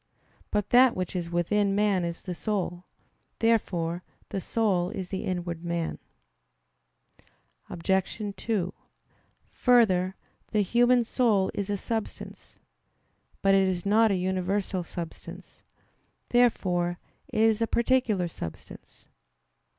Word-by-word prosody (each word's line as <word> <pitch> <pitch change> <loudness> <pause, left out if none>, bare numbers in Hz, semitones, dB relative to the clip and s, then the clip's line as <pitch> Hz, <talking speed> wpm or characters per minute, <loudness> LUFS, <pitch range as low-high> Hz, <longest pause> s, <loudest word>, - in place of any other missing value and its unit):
But 210 -2 -1
that 250 0 +6
which 185 0 -3
is 175 -2 -2
within 195 +4 +1
man 200 -3 +2
is 170 -1 -4
the 180 - -4
soul. 180 -2 -2 0.5
Therefore 175 -7 +1 0.3
the 195 - -3
soul 190 -4 +1
is 190 -4 -5
the 190 - -4
inward 175 -2 -3
man. 170 -1 -2 1.7
Obj. 190 +4 -1 0.2
2: 195 -6 -2 0.8
Further, 190 -7 +3 0.4
the 210 - +2
human 240 +4 +4
soul 220 -5 +2
is 200 0 -3
a 205 - 0
substance. 220 +2 -5 0.9
But 195 0 +5
it 195 -1 +4
is 180 -1 -2
not 220 +2 +4
a 200 - +2
universal 185 +1 -1
substance. 170 -1 -9 0.7
Therefore 180 -8 +2 0.3
it - - -3
is 225 0 +3
a 230 - +2
particular 235 -6 +1
substance. 80 - -9
195 Hz, 115 wpm, -27 LUFS, 175-220 Hz, 1.7 s, that